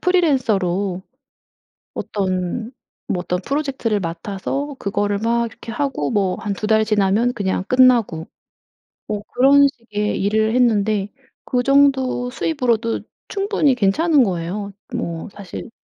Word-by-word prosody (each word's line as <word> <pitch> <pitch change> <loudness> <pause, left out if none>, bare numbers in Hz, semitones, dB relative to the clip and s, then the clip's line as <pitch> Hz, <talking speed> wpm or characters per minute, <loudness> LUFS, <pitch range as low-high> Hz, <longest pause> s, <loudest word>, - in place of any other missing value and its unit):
프리랜서로 205 - +1 0.9
어떤 190 +4 -2 0.4
뭐 180 - -1
어떤 180 0 -2
프로젝트를 270 -5 -1
맡아서 200 - -4
그거를 205 0 -1
막 235 +1 +1
이렇게 230 - -10
하고 245 - -2
뭐 195 -3 +1
한 205 -2 -2
2 210 +2 -4
달 220 -1 +4
지나면 215 +3 +2
그냥 190 -4 -1
끝나고. 245 -10 +3 0.8
뭐 210 -1 -3
그런 280 +3 +6
식의 215 -7 -3
일을 220 +3 +1
했는데 215 -4 +2 0.3
그 250 -1 0
정도 270 -2 +3
수입으로도 245 -5 0 0.3
충분히 395 -9 +1
괜찮은 275 - +3
거예요. 190 +2 -3 0.2
뭐 165 +2 -4
사실 200 +3 -8
220 Hz, 260 characters per minute, -20 LUFS, 195-260 Hz, 0.9 s, 그런